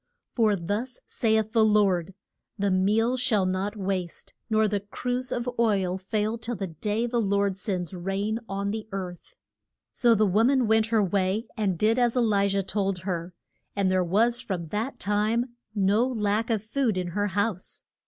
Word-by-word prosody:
For 220 -4 +3
thus 205 +8 -3
saith 220 -1 +1
the 225 -1 +4
Lord, 195 -4 +2 0.4
The 200 -1 +1
meal 215 +7 +2
shall 235 -6 +2
not 185 +3 -1
waste, 185 -3 -4 0.2
nor 220 -1 +3
the 205 -1 0
cruse 245 +5 -3
of 240 0 -2
oil 195 -5 +1
fail 215 +3 -1
till 235 +1 -4
the 195 - -3
day 205 +7 -2
the 240 0 0
Lord 200 -1 +1
sends 185 -2 -3
rain 195 +5 -2
on 200 +1 -2
the 220 0 -5
earth. 185 -3 -6 0.6
So 235 -2 +4
the 215 0 +3
wo 205 +3 +3
man 260 0 +3
went 220 0 +3
her 225 -2 +2
way 195 +3 0
and 195 -5 0
did 220 +6 +2
as 245 0 +2
E - - +5
li 205 -4 +3
jah 195 0 0
told 195 -1 -1
her, 175 -2 -4 0.4
and 195 -2 +1
there 185 -1 +2
was 225 +7 +2
from 185 -4 -3
that 225 +6 -2
time 220 +4 0 0.2
no 205 +4 +3
lack 220 -2 0
of 220 -3 0
food 225 -2 0
in 180 -1 -2
her 205 +4 -1
house. 200 -1 -2
205 Hz, 180 wpm, -26 LUFS, 190-225 Hz, 0.6 s, E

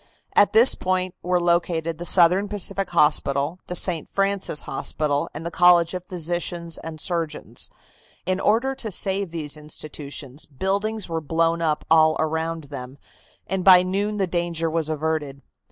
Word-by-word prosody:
At 205 - +5
this 230 +4 +7
point 185 0 -2
were 180 0 +1
located 170 -2 0
the 175 - -5
Southern 185 +3 +4
Pacific 195 -2 -1
Hospital, 150 0 +2
the 180 - -4
St. 175 -4 +2
Francis 195 -6 +1
Hospital 145 -2 -1
and 155 +3 -8
the 170 - -4
College 175 0 +4
of 180 0 -6
Physicians 175 -1 -3
and 160 -1 -8
Surgeons. 165 -2 -3 0.6
In 185 +1 -1
order 235 +7 +1
to 230 -4 -5
save 195 0 0
these 155 -3 -5
institutions, 150 -2 -7
buildings 200 +8 -2
were 165 -1 -3
blown 165 +2 0
up 155 -2 -1
all 155 -1 +5
around 160 +1 -2
them, 130 0 -8 0.5
and 190 -1 -3
by 180 -1 +8
noon 200 +3 -2
the 195 - +1
danger 170 -2 -2
was 160 -1 -1
averted. 155 -3 -3
170 Hz, 155 wpm, -23 LUFS, 155-185 Hz, 0.6 s, by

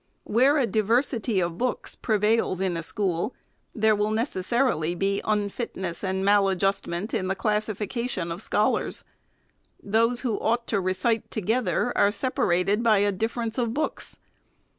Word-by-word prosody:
Where 260 +7 +3
a 275 - +3
diversity 225 +1 +1
of 170 0 -3
books 250 0 -2
prevails 215 -3 +1
in 190 -2 0
a 165 - -2
school, 190 +3 -2 0.4
there 220 -1 +3
will 210 +1 0
necessarily 220 - 0
be 195 +2 0
unut 210 +2 -1
nessandmal 190 +2 +1
adjustment 195 0 -1
in 185 - 0
the 190 - 0
classification 215 -1 -2
of 170 +4 -5
scholars. 210 -1 0 0.8
Those 230 +4 +1
who 235 -5 -1
ought 235 +1 0
to 200 -3 +1
recite 185 +5 0
together 230 +3 0
are 200 - +4
separated 205 -4 +1
by 225 -3 +4
a 205 +1 +2
difference 225 +4 -2
of 235 -1 -1
books. 310 - -2
210 Hz, 140 wpm, -26 LUFS, 190-230 Hz, 0.8 s, are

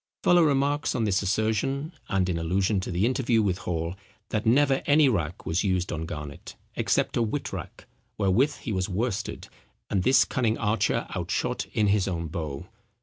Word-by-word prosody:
Fuller 175 -1 +5
remarks 145 0 +1
on 120 - 0
this 100 -2 +1
assertion 110 - 0 0.2
and 95 -1 +1
in 85 -2 -1
allusion 95 +5 +1
to 95 - -5
the 90 +3 +1
interview 120 -3 +2
with 95 -2 0
Hall, 85 0 -2 0.4
that 110 +1 -1
"never 135 +3 +4
any 145 0 +6
rack 85 - -1
was 80 +3 0
used 95 -3 0
on 80 -1 -3
Garnet, 75 -4 -7 0.2
except - - +1
a - - +2
witrack, 115 +6 -4 0.3
wherewith 110 +9 +2
he 120 - -4
was 95 0 -1
worsted, 100 +1 -3 0.4
and 100 - +2
this 130 +8 +5
cunning 115 -4 0
archer 110 0 +1
outshot - - -2
in 105 - +2
his 100 -2 +2
own 85 -3 -3
bow. 75 -4 -5
105 Hz, 170 wpm, -26 LUFS, 90-125 Hz, 0.4 s, any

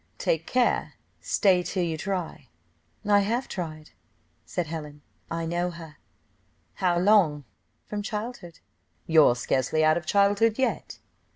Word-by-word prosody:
"Take - - -1
care 250 -1 +1 0.3
stay 190 -4 +2
till 180 +1 -2
you 165 -2 -1
try." 175 -5 -4 0.6
"I 205 -1 +5
have 230 +6 -1
tried," 155 -4 -6 0.6
said 175 - -2
Helen, 150 -2 -7 0.3
"I 165 0 -3
know 175 +2 -1
her." 165 -3 -11 0.8
"How 180 -3 +1
long?" 175 -6 +3 0.4
"From 210 -1 -4
childhood!" 210 -4 -6 0.4
"You're 155 -6 +5
scarcely 130 +5 0
out 155 +1 +4
of 170 -2 -6
childhood 205 +2 +3
yet." 265 -1 -2
175 Hz, 125 wpm, -26 LUFS, 155-205 Hz, 0.8 s, I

